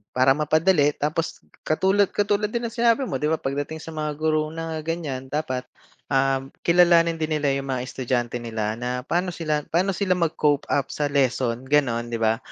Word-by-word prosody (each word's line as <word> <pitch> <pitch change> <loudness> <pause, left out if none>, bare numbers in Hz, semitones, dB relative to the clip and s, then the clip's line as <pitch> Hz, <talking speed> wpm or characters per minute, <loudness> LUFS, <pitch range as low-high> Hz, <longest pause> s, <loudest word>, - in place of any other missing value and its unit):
Para 130 +2 +4
mapadali 155 0 +3
tapos 155 +3 -2 0.2
katulad 190 +6 +3
katulad 205 0 +1
din 235 +3 -2
ng 235 - -14
sinabi 235 +2 +3
mo - - -1
'di 150 +1 0
ba, 160 - -2
pagdating 145 +3 -3
sa - - -9
mga 155 -1 -3
guro 155 0 0
na 165 0 -4
ganyan 155 -6 -3
dapat, 130 -2 -3 0.4
um, 135 +1 0
kilalanin 170 -1 +4
din 155 -1 -2
nila 150 -2 +1
yung 135 - -4
mga 130 -2 -2
estudyante 125 -1 -2
nila 110 -2 -3
na 125 +1 -3
pa'no 175 +6 -1
sila 155 -3 -2
pa'no 180 +4 +2
sila 195 -1 +1
mag 170 -3 -1
cope 145 -1 +1
up 140 -2 0
sa 145 -1 -1
lesson, 130 -3 0
gano'n, 120 -4 +1
'di 115 - -2
ba? 110 0 +3
150 Hz, 185 wpm, -24 LUFS, 130-165 Hz, 0.4 s, Para